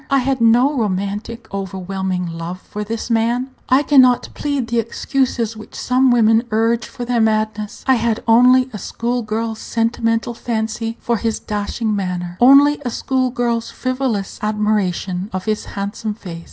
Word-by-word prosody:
I 275 - +3
had 265 -1 0
no 245 +5 +4
romantic, 205 +1 -3
overwhelming 190 -1 -3
love 165 +2 -6
for 210 - -5
this 225 +2 -4
man. 235 +3 +1 0.2
I 260 +3 +4
can 285 -2 +6
not 250 -1 +3
plead 285 -4 -2
the 235 0 +1
excuses 230 0 -1
which 215 - -12
some 255 +1 +2
women 225 -2 +4
urge 225 +1 +1
for 245 -3 -7
their 240 -1 +1
madness. 215 -1 -1
I 265 - +4
had 230 -1 0
only 250 +3 +6
a 210 - -5
school 240 +5 -2
girl's 220 0 -3
sentimental 230 0 -1
fancy 225 0 -3
for 235 -1 0
his 225 +1 -1
dashing 210 +1 -2
manner, 180 -3 -3
only 285 +3 +6
a 250 - -2
school 255 +2 0
girl's 235 -2 -1
frivolous 255 -6 -2
admiration 210 -3 -1
of 185 0 -4
his 215 -1 -1
handsome 205 +2 -4
face. 175 -6 -8
225 Hz, 160 wpm, -19 LUFS, 210-245 Hz, 0.2 s, can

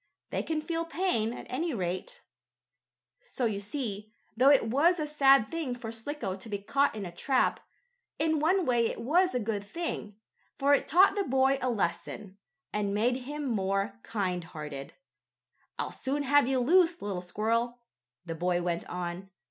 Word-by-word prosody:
They - - 0
can 315 -1 -2
feel 330 +1 -2
pain, 330 - 0
at - - -8
any 310 +3 -2
rate. 185 - -4 1.0
So 270 - -3
you 210 -3 0
see, 210 -1 -4 0.2
though 255 +4 +5
it 280 -5 +5
was 320 +9 +3
a 305 - 0
sad 275 -6 +4
thing 320 -7 -2
for 235 -2 -6
Slicko 225 -3 -4
to 210 +4 -9
be 205 - -1
caught 275 +7 +1
in 205 -2 -4
a 175 - -6
trap, 255 +9 +1 0.6
in 315 0 +1
one 350 +4 +2
way 240 -2 +3
it - - -5
was 340 +5 +2
a - - +2
good 210 -2 -2
thing, 210 - -5 0.4
for 280 +1 +3
it 285 - +2
taught 380 +4 +6
the 405 0 0
boy 265 -2 +2
a 255 - +1
lesson, 195 -1 -3 0.3
and 205 -1 -1
made 240 +4 +2
him 295 0 -4
more 200 -2 -1
kind 185 -6 -2
hearted. 150 -5 -7 0.8
"I'll - - -3
soon 280 +2 -2
have 285 -1 +4
you 265 0 +1
loose, 335 +6 +4
little 195 -3 -3
squirrel," 230 +6 -1 0.5
the 165 - -4
boy 175 +2 0
went 175 -1 -2
on. 180 +1 -5
240 Hz, 170 wpm, -29 LUFS, 200-295 Hz, 1.0 s, taught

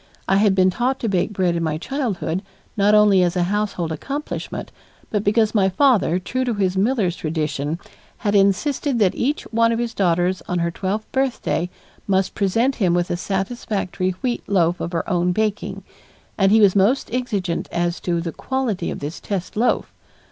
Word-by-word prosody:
I 195 - +3
had 200 -1 +4
been 185 -1 +4
taught 255 +7 -1
to 230 - -1
bake 195 0 0
bread 185 -4 +1
in 170 - -1
my 155 -2 -1
childhood 195 - -2 0.3
not 205 +1 +4
only 210 -3 +6
as 175 0 +1
a 180 - +2
household 200 -3 -1
accomplishment, 275 - -5 0.4
but 210 -2 0
because 215 +1 +2
my 195 -3 +3
father, 205 - +3
true 255 +8 -2
to 245 -3 -1
his 190 -2 0
miller's 200 -3 +1
tradition, 155 -1 -2 0.4
had 205 - -1
insisted 235 +7 +2
that 200 -5 +3
each 285 +5 -1
one 230 0 +4
of 230 - 0
his 235 -1 -2
daughters 180 -1 +1
on 180 - -1
her 170 0 0
twelfth 200 +5 -3
birthday 265 -9 0 0.4
must 190 -1 +1
present 225 +7 +1
him 180 -6 +2
with 175 0 0
a - - +1
satisfactory 195 -1 -2
wheat 245 -2 0
loaf 175 -3 +2
of 170 - -3
her 165 -2 -2
own 180 -1 +1
baking, 215 +1 -2 0.5
and 195 -1 +3
he 220 +1 +6
was 200 -2 +5
most 220 +5 +2
exigent 200 -9 -2
as 175 0 -1
to 170 -2 -1
the 165 -1 -3
quality 245 -9 -2
of - - -5
this 150 +4 -5
test 190 -3 -4
loaf. 235 +4 +1
195 Hz, 185 wpm, -21 LUFS, 175-225 Hz, 0.5 s, only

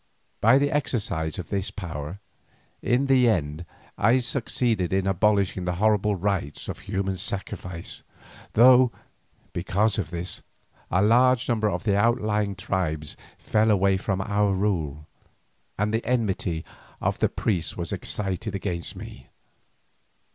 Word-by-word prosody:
By 115 +5 +6
the 145 +1 +1
exercise 100 - -1
of 90 - -6
this 100 -1 -1
power, 85 -2 -6 0.6
in 125 +3 +2
the 130 -3 +4
end 80 -4 -1 0.3
I 115 +5 +5
succeeded 120 -6 0
in 95 0 +1
abolishing 95 -2 +1
the 90 0 -1
horrible 105 +1 +2
rites 95 -6 -2
of - - -5
human 95 -1 -2
sacrifice, 90 -3 -4 0.5
though, 125 +1 +7 0.6
because 100 +4 +1
of 85 -6 -3
this, 85 +1 -4 0.5
a 90 +3 +2
large 125 +3 +4
number 110 -3 +1
of - - -3
the 100 -3 +2
outlying 105 -2 +1
tribes 80 -7 -2 0.2
fell 110 +1 +1
away 100 -2 +3
from 95 0 -1
our 100 0 +1
rule, 80 -7 -1 0.7
and 105 +2 0
the 115 - 0
enmity 105 -8 -1 0.3
of - - -1
the - - +2
priests 90 -6 -1
was 85 - -3
excited 100 +1 -2
against 90 -4 -4
me. 65 - -10
100 Hz, 135 wpm, -25 LUFS, 90-110 Hz, 0.7 s, though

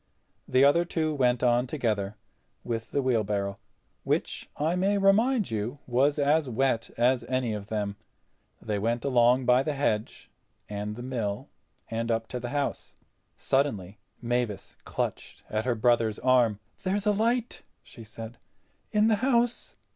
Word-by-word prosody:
The 130 +1 +4
other 145 +5 +5
two 160 -2 -1
went 125 -3 +1
on 120 +1 +3
together—with 110 -1 -4
the 140 - 0
wheelbarrow, 105 -5 0 0.5
which, - - -2
I 160 +4 +1
may 195 +3 +2
remind 205 - +3
you, 110 +5 -3
was 135 +4 +2
as 145 0 +2
wet 120 -1 0
as 120 +1 +3
any 125 -2 -1
of 105 -1 -6
them. 105 -2 -3 0.6
They 105 -2 -2
went 115 +4 -1
along 125 -1 +4
by 125 +1 +5
the 150 +2 -1
hedge 110 -6 -2 0.4
and 105 +1 -4
the 120 - -7
mill 115 -6 -3 0.4
and 115 +1 -2
up 115 -1 0
to 125 - -4
the 120 0 -5
house. 145 +1 -3 0.4
Suddenly 105 -9 -1 0.2
Mavis 120 -4 -2
clutched - - -4
at 110 +1 -1
her 125 -2 +1
brother's 115 -1 +2
arm. 125 -5 +3 0.2
"There's 195 +2 -1
a 210 - +4
light," 235 +3 0 0.2
she 115 - -12
said, 115 +2 -9 0.5
"in 210 +1 +3
the 220 -2 +3
house." 240 0 0
125 Hz, 145 wpm, -27 LUFS, 110-145 Hz, 0.6 s, other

